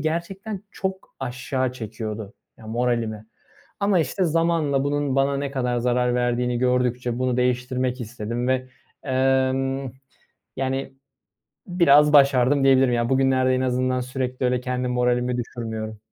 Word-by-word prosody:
gerçekten 185 +6 -3
çok 190 -1 -5
aşağı 130 0 -2
çekiyordu, 110 -3 -6 0.2
ya, 110 - -13
moralimi 115 -2 -1 0.5
ama, 200 -2 +2
işte, 165 +5 0
zamanla 165 -4 +1
bunun 145 -1 -1
bana 140 0 +2
ne 140 -1 -3
kadar 125 -3 -1
zarar 125 0 +1
verdiğini 125 0 0
gördükçe 125 -1 0
bunu 125 -1 0
değiştirmek 125 0 0
istedim 120 +1 -4
ve, 130 0 0 0.4
emm, 135 0 +1 0.7
yani, 135 0 -2 0.7
biraz 150 -5 +5
başardım 140 -1 +5
diyebilirim. 130 -2 +5
Yani, 120 0 +1
bugünlerde 130 -1 +2
en 130 - 0
azından 130 0 0
sürekli 125 0 -3
öyle 125 0 +1
kendi 125 0 -2
moralimi 125 0 +1
düşürmüyorum. 110 -3 -5
130 Hz, 125 wpm, -23 LUFS, 125-135 Hz, 0.7 s, biraz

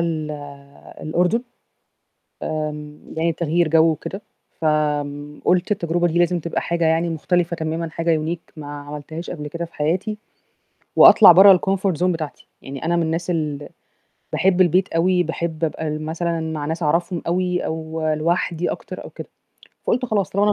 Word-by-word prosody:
ال 160 -2 -2 0.7
الأردن. 180 +9 +1 1.0
آمم، 150 -1 -5
يعني 165 +1 +1
تغيير 170 +1 +1
جو 160 +1 +4
وكده. 190 +5 -6 0.4
فم 150 -1 -1
قُلت 180 +2 +2
التجربة 175 -3 +1
دي 170 +1 0
لازم 175 0 +2
تبقى 170 +1 -3
حاجة 170 -1 -1
يعني 165 +1 +2
مختلفة 170 +2 0
تمامًا 160 0 -3
حاجة 165 0 0
unique 160 +2 -5
ما 150 -2 -8
عملتهاش 150 +3 -7
قبل 150 -4 -6
كده 170 +3 -4
في 170 - -19
حياتي، 180 +8 -1 0.8
وأطلع 200 -5 +9
برّه 190 +1 +8
الcomfort 195 0 0
zone - - +2
بتاعتي، 155 -3 -6 0.2
يعني 135 0 -7
أنا 170 +1 +1
من 170 - +2
الناس 165 +2 -2
ال 150 -4 -2 0.6
باحب 185 0 +2
البيت 185 +2 +4
أوي، 180 +2 +3
باحب 170 -2 -3
أبقى 160 0 -2
مثلًا 165 +2 -2
مع 160 -2 -4
ناس 160 +3 -3
أعرفهم 170 +3 0
أوي 180 +1 0
أو 160 0 -4
لوحدي 170 +1 0
أكتر - - -7
أو - - -9
كده، - - -9 0.6
فقُلت 250 +2 +1
خلاص 215 -6 0
طالما 200 +2 +1
أنا 210 - +4
165 Hz, 160 wpm, -21 LUFS, 155-175 Hz, 1.0 s, وأطلع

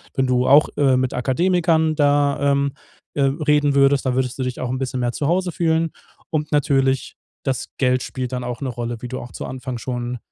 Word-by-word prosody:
Wenn 135 - +2
du 125 0 +2
auch, 145 +3 +6
äh, 135 -3 +4
mit 130 0 0
Akademikern 160 +4 +2
da, 145 -1 +2
ähm, 140 0 +1 0.4
äh, 145 - -1
reden 145 0 +2
würdest, 140 0 +4
dann 130 -1 +1
würdest 130 0 -1
du - - 0
dich 125 0 -4
auch 125 - -3
'n 130 - -2
bisschen 130 -1 -3
mehr 120 0 0
zu 140 - -2
Hause 180 +2 +1
fühlen. 165 -1 +1 0.4
Und 150 -1 -2
natürlich, 135 -2 +1 0.3
das 135 -2 -2
Geld 130 -1 +2
spielt 130 -1 -5
dann 125 -1 -3
auch 125 +1 -5
'ne 135 - -2
Rolle, 120 -1 -4
wie 125 - -5
du 130 +1 -5
auch 120 - -9
zu - - -6
Anfang 130 -1 -5
schon 120 0 -4
135 Hz, 215 wpm, -21 LUFS, 125-145 Hz, 0.4 s, auch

